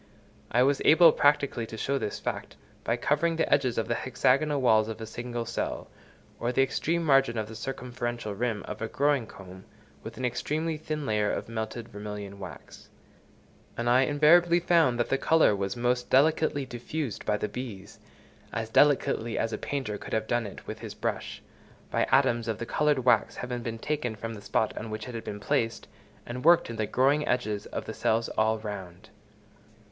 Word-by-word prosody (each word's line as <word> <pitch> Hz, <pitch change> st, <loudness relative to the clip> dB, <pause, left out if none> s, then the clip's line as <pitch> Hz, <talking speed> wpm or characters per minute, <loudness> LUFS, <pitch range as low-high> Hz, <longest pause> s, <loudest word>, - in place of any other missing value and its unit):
I 125 Hz, +2 st, +4 dB
was 140 Hz, +1 st, +2 dB
able 165 Hz, +1 st, +7 dB
practically 145 Hz, -6 st, +2 dB
to 110 Hz, -, -8 dB
show 140 Hz, +4 st, -1 dB
this 105 Hz, -, -3 dB
fact, -, -, -5 dB, 0.3 s
by -, -, 0 dB
covering 165 Hz, +3 st, +1 dB
the 160 Hz, -, +1 dB
edges 125 Hz, -3 st, +2 dB
of 115 Hz, -, 0 dB
the -, -, 0 dB
hexagonal 140 Hz, +4 st, +1 dB
walls 110 Hz, -4 st, +4 dB
of 110 Hz, 0 st, -6 dB
a 110 Hz, -, -5 dB
single 120 Hz, +1 st, -5 dB
cell, 115 Hz, -, -4 dB, 0.5 s
or 120 Hz, -, 0 dB
the 135 Hz, +2 st, +3 dB
extreme 165 Hz, +5 st, -1 dB
margin 135 Hz, -5 st, +3 dB
of 110 Hz, -1 st, -2 dB
the 110 Hz, -, -9 dB
circumferential 120 Hz, -2 st, -4 dB
rim 110 Hz, 0 st, -2 dB
of 105 Hz, +1 st, -7 dB
a 115 Hz, -, -1 dB
growing 140 Hz, -2 st, +1 dB
comb, 95 Hz, -1 st, -12 dB, 0.4 s
with 110 Hz, -, -9 dB
an 130 Hz, -, -2 dB
extremely 155 Hz, +6 st, -1 dB
thin 155 Hz, -1 st, -4 dB
layer 105 Hz, -3 st, +1 dB
of -, -, -3 dB
melted 110 Hz, 0 st, -5 dB
vermilion 105 Hz, -1 st, -7 dB
wax; 95 Hz, -, -11 dB, 0.9 s
and 120 Hz, -, -2 dB
I 125 Hz, +2 st, +5 dB
invariably 170 Hz, +4 st, +5 dB
found 165 Hz, -8 st, +3 dB
that 120 Hz, -, 0 dB
the 135 Hz, -, +1 dB
colour 160 Hz, -10 st, +4 dB
was 100 Hz, +1 st, -3 dB
most 125 Hz, +1 st, 0 dB
delicately 145 Hz, 0 st, +3 dB
diffused 125 Hz, +1 st, -5 dB
by 105 Hz, -1 st, 0 dB
the 105 Hz, -, -2 dB
bees—as 110 Hz, 0 st, -9 dB
delicately 125 Hz, -5 st, +3 dB
as 115 Hz, 0 st, -1 dB
a -, -, -1 dB
painter 130 Hz, -8 st, -3 dB
could -, -, -8 dB
have 110 Hz, 0 st, 0 dB
done 120 Hz, -1 st, 0 dB
it 100 Hz, -, -11 dB
with -, -, -7 dB
his -, -, -8 dB
brush—by -, -, -4 dB
atoms 120 Hz, -1 st, +3 dB
of 110 Hz, -2 st, -1 dB
the 115 Hz, -, -5 dB
coloured 145 Hz, -1 st, +1 dB
wax 120 Hz, -3 st, +3 dB
having 125 Hz, -1 st, -4 dB
been 115 Hz, -1 st, -4 dB
taken 125 Hz, -3 st, -2 dB
from 115 Hz, +1 st, -6 dB
the 105 Hz, -, -9 dB
spot 110 Hz, +2 st, 0 dB
on 110 Hz, -, -6 dB
which 110 Hz, 0 st, -5 dB
it 125 Hz, -, -7 dB
had 115 Hz, -1 st, -5 dB
been 105 Hz, -, -6 dB
placed, 115 Hz, +2 st, -1 dB, 0.4 s
and 125 Hz, +1 st, -6 dB
worked 170 Hz, -6 st, +5 dB
into 115 Hz, -1 st, -3 dB
the 105 Hz, -, -1 dB
growing 140 Hz, +4 st, +2 dB
edges 110 Hz, -4 st, -1 dB
of -, -, -5 dB
the -, -, -5 dB
cells 115 Hz, +1 st, 0 dB
all 110 Hz, +1 st, +1 dB
round. 100 Hz, -5 st, -8 dB
120 Hz, 190 wpm, -28 LUFS, 110-140 Hz, 0.9 s, able